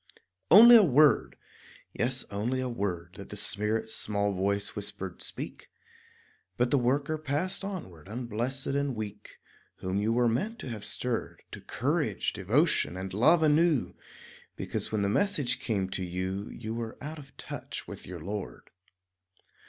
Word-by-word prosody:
Only 235 +6 +10
a - - +8
word, 150 -4 +4 0.6
yes, 125 +4 -1
only 115 +6 -1
a 130 - -1
word, 90 -7 -3
That 100 - -9
the 105 - -6
Spirit's 105 +2 -1
small 100 -1 -1
voice 100 +2 -1
whispered 100 -3 -5
"Speak"; - - -7 0.9
But 120 0 +1
the 140 - +4
worker 140 +5 0
passed 155 +7 -2
onward 95 - -7
unblessed 120 +4 -2
and 140 -1 -1
weak 105 -1 -7 0.4
Whom 95 +1 -2
you 110 +2 +1
were 120 +1 +3
meant 205 - -1
to - - -7
have 110 -3 -6
stirred 125 -2 -3
To - - -8
courage, - - -1
devotion, 90 - +2
and 95 0 -5
love 155 - +5
anew, 155 -2 +3 0.6
Because - - -4
when 105 -2 0
the - - +2
message 140 - +2
came 105 -7 -1
to 95 - -2
you 95 +3 -3
You 110 -1 -6
were 115 -1 -5
"out 150 +3 -6
of 135 -1 -15
touch" - - -7
with - - -9
your 90 -3 -7
Lord. 100 +4 -6
115 Hz, 150 wpm, -29 LUFS, 100-140 Hz, 0.9 s, Only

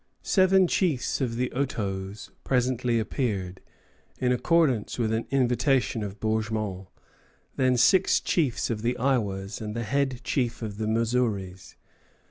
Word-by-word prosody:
Seven 190 -1 +4
chiefs 165 -8 0
of 120 -3 -1
the 125 +1 -1
Otoes 100 -7 -3
presently 125 -2 +1
appeared, 100 -6 -3 0.6
in 125 -1 +1
accordance 130 -2 +1
with 110 -2 0
an 110 +1 -2
invitation 125 -2 +1
of 100 -1 -6
Bourgmont; 110 -3 -2 0.7
then 130 -1 +2
six 190 +9 +4
chiefs 140 -8 0
of 110 -2 -3
the 120 +2 -1
Iowas 105 -7 -1
and 105 0 -5
the 115 - -2
head 135 +1 -1
chief 120 -3 -1
of 105 -1 -6
the 110 - -1
Missouris. 110 -5 -1
120 Hz, 130 wpm, -26 LUFS, 105-130 Hz, 0.7 s, Seven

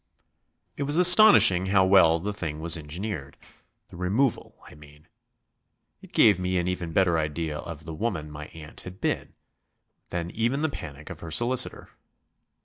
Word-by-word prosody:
It - - -7
was 145 +3 -1
astonishing 180 - +7
how 95 -1 +3
well 95 -4 +4
the 105 +5 -4
thing 80 -6 -6
was 85 +1 +2
engineered; 80 -1 -7 0.5
the - - -13
removal, 105 +9 -2
I - - -15
mean. 75 +1 -18 0.9
It 190 -2 -16
gave 105 - +4
me 90 0 -2
an 90 0 -2
even 90 -2 -4
better 85 -1 +1
idea 75 0 -4
of 80 -1 -9
the 80 - -7
woman 80 -5 -4
my 75 0 -9
aunt 80 -1 -13
had 90 +1 -12
been - - -4 0.7
than 85 0 -5
even 120 +6 -2
the 160 - 0
panic 75 - -10
of 85 - -10
her 85 - -9
solicitor. 120 +9 0
90 Hz, 160 wpm, -25 LUFS, 80-105 Hz, 0.9 s, astonishing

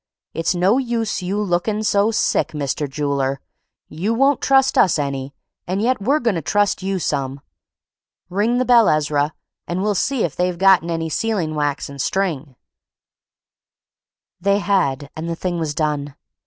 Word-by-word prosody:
It's 165 +2 0
no 190 +8 +3
use 230 -5 -2
you 190 +3 -2
lookin' 210 +2 0
so 205 0 +2
sick, 220 -6 0
Mr. 145 0 -2
Jooler; 140 -1 -1 0.5
you 195 +9 -2
won't 275 +2 +3
trust 270 -1 +3
us 180 - +4
any, 140 -1 -3 0.3
and 185 +2 -1
yet 240 +1 +1
we're 270 +9 +2
goin' 235 -5 +1
to 165 - -2
trust 205 +4 +1
you 195 0 -1
some. 140 -5 -2 0.9
Ring 210 +7 0
the 255 - +1
bell, 235 -2 +5
Ezra, 150 0 +1 0.3
and 180 +2 -2
we'll 210 0 +1
see 255 +5 0
if 160 - -2
they've 180 -1 -1
gotten 190 -2 +4
any 165 -1 -2
sealing 175 -1 -1
wax 145 -2 -1
and 140 -1 -6
string." 155 -9 -2 1.8
They 200 +2 +2
had; 150 -9 0
and 160 +1 -5
the 165 - -2
thing 175 0 -3
was 155 -3 -2
done. 145 -2 -2
180 Hz, 160 wpm, -20 LUFS, 150-210 Hz, 1.8 s, bell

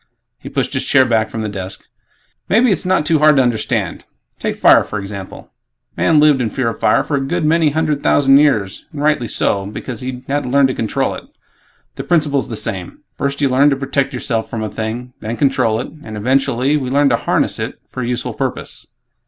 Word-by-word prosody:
He - - -9
pushed - - -2
his - - -1
chair 130 - +4
back 110 -2 +1
from 110 0 -4
the - - -2
desk, 95 -2 -7 0.6
"Maybe 230 +3 +4
it's 185 - -1
not 185 -5 +2
too 160 0 +2
hard 150 0 +5
to 135 - +4
understand. 120 -3 -1 0.4
Take - - -2
'fire' - - +5
for 105 - -5
example: 100 -1 -8 0.4
Man 155 -2 +3
lived 150 -3 +4
in 115 - 0
fear 130 -2 -1
of - - -7
fire - - +3
for 145 - -1
a - - -1
good 155 +4 -1
many 160 0 +3
hundred 150 -1 -1
thousand 135 -1 +5
years 110 -11 +1
and 145 -2 -5
rightly 150 -6 +1
so, 100 -2 0
because 110 +3 -6
he 125 0 -6
hadn't 140 -2 -1
learned 140 -1 +4
to - - -1
control 115 -3 -1
it. - - -9 0.7
The - - -4
principle's 150 -5 +1
the 115 - -4
same; 95 -5 -5
First 140 +1 -2
you 140 - +3
learn 135 +3 +4
to 140 - +1
protect 135 0 -1
yourself 120 -3 -2
from 110 -1 -4
a 110 - -3
thing; 115 +4 -5
then 115 +2 -5
control 115 -5 +1
it; - - -5
and, 110 -1 -7
eventually, 130 +4 +1
we 130 -3 -3
learn 140 +1 +3
to 120 - +2
'harness' - - 0
it - - -4
for 130 - -6
a 120 - -2
useful 125 0 -2
purpose." - - -3
130 Hz, 215 wpm, -17 LUFS, 115-145 Hz, 0.7 s, hard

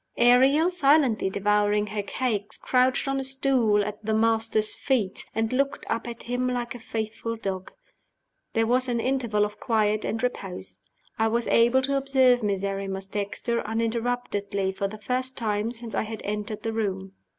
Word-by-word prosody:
Ariel, 265 +8 +5
silently 280 - +3
devouring 205 +1 +2
her 210 0 -3
cakes, 205 -1 -3
crouched 255 +2 +2
on 270 0 0
a - - -2
stool 260 -6 +2
at 210 +1 -6
"the 220 +1 0
Master's" 225 -1 +2
feet, 230 -9 -1
and 225 +2 0
looked 275 +2 0
up 230 +1 -2
at 235 0 -7
him 245 +1 -1
like 245 -2 -2
a 245 - -9
faithful 225 +1 -4
dog. 190 -4 -5 0.8
There 225 0 +2
was 255 +3 +2
an 235 -1 0
interval 235 -5 +1
of 210 0 -8
quiet 215 -2 +1
and 225 +1 -2
repose. 180 - -4 0.4
I 225 - +3
was 235 +1 0
able 240 +3 +4
to 275 +1 +1
observe 260 -2 +3
Miserrimus 195 -1 -2
Dexter 205 +4 -2
uninterruptedly 225 -3 -1
for 195 +1 -2
the 215 +2 -8
first 255 +4 -1
time 215 -2 -1
since 235 -1 -7
I - - +1
had 220 0 -6
entered 210 +1 -4
the 225 - -2
room. 195 -3 -2
225 Hz, 165 wpm, -26 LUFS, 210-250 Hz, 0.8 s, Ariel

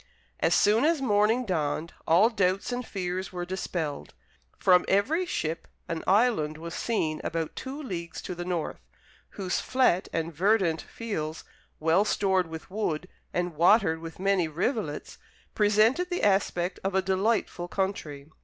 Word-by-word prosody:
As - - +3
soon 215 +4 +4
as 325 0 +3
morning 225 0 +2
dawned, 160 -3 -2
all 190 +8 +5
doubts 195 0 0
and 245 0 -2
fears 185 -3 -4
were 175 -1 -4
dispelled. 175 -5 -4 0.4
From 180 -1 +5
every 305 - +2
ship 165 - -3 0.2
an 165 -1 -3
island 195 -7 +3
was 165 +1 -7
seen 160 -10 -1
about 165 -1 -3
two 265 +3 -6
leagues 170 - -5
to - - -4
the 175 0 -5
north, 175 -3 -3 0.6
whose 185 -3 -1
flat 250 -8 +2
and 165 0 -2
verdant 185 -1 +2
fields, 160 -9 -5 0.4
well 165 +5 +3
stored 190 -4 +1
with 160 +3 -9
wood, 185 -4 -2 0.2
and 175 -1 -1
watered 160 0 +4
with 165 0 -8
many 190 -3 +2
rivulets, 170 - -3 0.3
presented 215 - +3
the 355 - -2
aspect 190 -3 +1
of 195 0 -1
a 190 - +3
delightful 190 -1 0
country. 170 -7 -3
185 Hz, 145 wpm, -27 LUFS, 165-215 Hz, 0.6 s, all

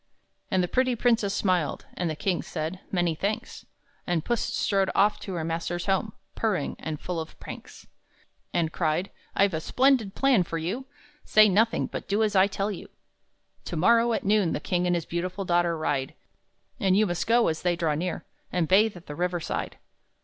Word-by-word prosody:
And 185 -3 +2
the - - 0
pretty 255 +4 +1
princess 230 -4 +2
smiled, 180 -7 0
And 175 -2 -2
the 155 - -2
king 180 +3 -1
said, 160 +3 -4
"Many 175 -3 +1
thanks." 200 +7 -4 0.4
And 170 -3 0
Puss 240 -2 0
strode 195 -1 +1
off 205 +2 +3
to 190 - -6
her 165 - -2
master's 170 +2 -3
home, 200 +2 0 0.2
Purring, 205 -10 -1
and 155 -2 -4
full 180 -2 -3
of 160 - -8
pranks. - - -10 0.7
And 165 -2 0
cried, 170 +3 0 0.2
"I've 200 -1 +3
a 160 - -1
splendid 250 -2 +2
plan 270 -7 +4
for 165 -1 -3
you! 200 +12 -3 0.4
Say 215 0 +6
nothing, 220 +4 +2
but - - -6
do 205 +2 +2
as 210 -1 0
I 190 +1 +6
tell 200 +1 -2
you 195 - -7
to! - - -36 0.7
"To - - -5
morrow, 230 +7 +4
at - - -1
noon, 200 -4 +3
the - - -1
king 180 0 0
And 175 - +2
his 170 -2 -2
beautiful 185 +3 -3
daughter 175 -1 +2
ride; 140 -4 -2 0.6
And 190 0 +3
you 215 - +4
must 175 -3 -2
go, 235 +1 +4
as 160 - -1
they 175 -1 +1
draw 165 -3 0
near, 175 +4 -3 0.3
And 175 -3 0
bathe 200 +2 +4
at 175 - -14
the 150 - -7
river 180 +3 -1
side." - - -4
185 Hz, 195 wpm, -27 LUFS, 170-210 Hz, 0.7 s, Say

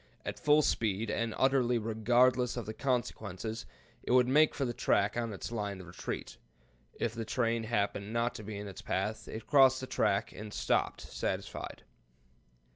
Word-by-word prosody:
At - - -4
full 150 +1 +5
speed, 110 -3 0
and 115 +1 -1
utterly 130 -2 +3
regardless 120 +3 +2
of 120 - -3
the 110 - -5
consequences, 110 - -2 0.3
it - - -9
would 125 -1 +6
make 150 +4 +4
for 140 - 0
the 120 - -2
track 100 -2 +2
on 115 -1 -1
its 100 - -6
line 105 -4 -3
of 95 - -9
retreat. 85 +1 -6 0.6
If 115 - -2
the 115 -1 -4
train 115 0 0
happened 100 -2 -1
not 115 +1 0
to 110 - -8
be 105 0 -6
in 105 0 -6
its 95 - -8
path, 105 +3 -2
it 110 0 -7
crossed 135 -3 +6
the 130 - -4
track 100 -4 +1
and 105 0 -8
stopped - - 0
satisfied. - - -4
115 Hz, 175 wpm, -32 LUFS, 105-125 Hz, 0.6 s, would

